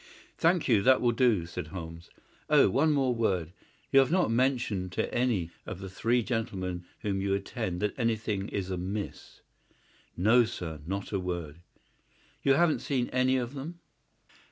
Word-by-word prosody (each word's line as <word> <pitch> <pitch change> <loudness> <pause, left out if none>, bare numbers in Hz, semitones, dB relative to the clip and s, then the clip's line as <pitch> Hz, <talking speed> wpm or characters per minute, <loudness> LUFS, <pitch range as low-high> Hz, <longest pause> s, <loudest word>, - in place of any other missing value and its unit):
"Thank 170 0 +2
you; 115 -6 +4
that 130 +4 +5
will 120 - +3
do," 115 -7 +2
said 85 -1 -6
Holmes. 80 0 -8 0.4
"Oh, - - +5
one 150 +8 +3
more 135 -4 +2
word. 95 -8 -1 0.4
You 135 - +7
have 135 +2 +3
not 180 -8 +2
mentioned 120 -7 0
to - - -2
any 115 -9 0 0.2
of 95 - -5
the 95 0 -8
three 120 +5 +1
gentlemen 95 -7 -3 0.2
whom 100 -3 -1
you 100 0 +1
attend 100 -2 -4
that 105 - 0
anything 110 -4 -1
is 95 -1 -3
amiss?" 95 +3 -5 0.8
"No, 110 +7 +5
sir; 85 -9 -5
not 100 +2 -4
a 100 - 0
word." 85 -4 -4 0.8
"You 135 - +4
haven't 170 0 +3
seen 130 -4 -1
any 130 +1 +2
of 125 +1 -3
them?" 155 +5 -7
110 Hz, 160 wpm, -29 LUFS, 90-125 Hz, 0.8 s, You